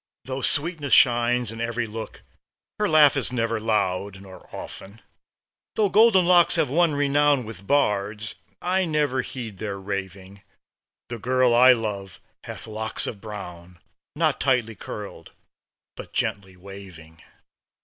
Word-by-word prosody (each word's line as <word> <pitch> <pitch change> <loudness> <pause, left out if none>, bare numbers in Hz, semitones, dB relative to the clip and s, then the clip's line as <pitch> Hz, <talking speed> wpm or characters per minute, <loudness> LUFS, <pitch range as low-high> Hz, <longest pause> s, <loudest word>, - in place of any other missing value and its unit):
Though 130 +1 -4
sweetness 145 +1 0
shines 120 -2 +4
in 115 0 -7
every 115 0 -2
look, 110 0 -8 0.6
Her 210 -1 +1
laugh 150 -2 +6
is 135 -2 0
never 115 -2 -1
loud, 100 -3 -1
nor 95 -2 -14
often. 100 +3 -9 0.8
Though 210 -2 +2
golden 205 -3 +5
locks 175 -1 +5
have 165 -6 0
won 165 0 +2
renown 145 -2 +2
With 100 -3 -8
bards, 105 -6 0 0.3
I 185 +1 +1
never 150 -5 0
heed 115 -6 -8
their 100 -2 -4
raving; 100 0 -6 0.7
The 120 -1 -6
girl 125 +1 +2
I 125 +2 +7
love 100 -5 -5 0.3
hath - - -7
locks 110 0 -2
of 100 - -6
brown, 90 -5 -9 0.4
Not - - 0
tightly 125 -4 +1
curled, 105 0 -9 0.6
but - - -10
gently 95 -2 -3
waving. 90 -4 -13
115 Hz, 135 wpm, -24 LUFS, 100-140 Hz, 0.8 s, I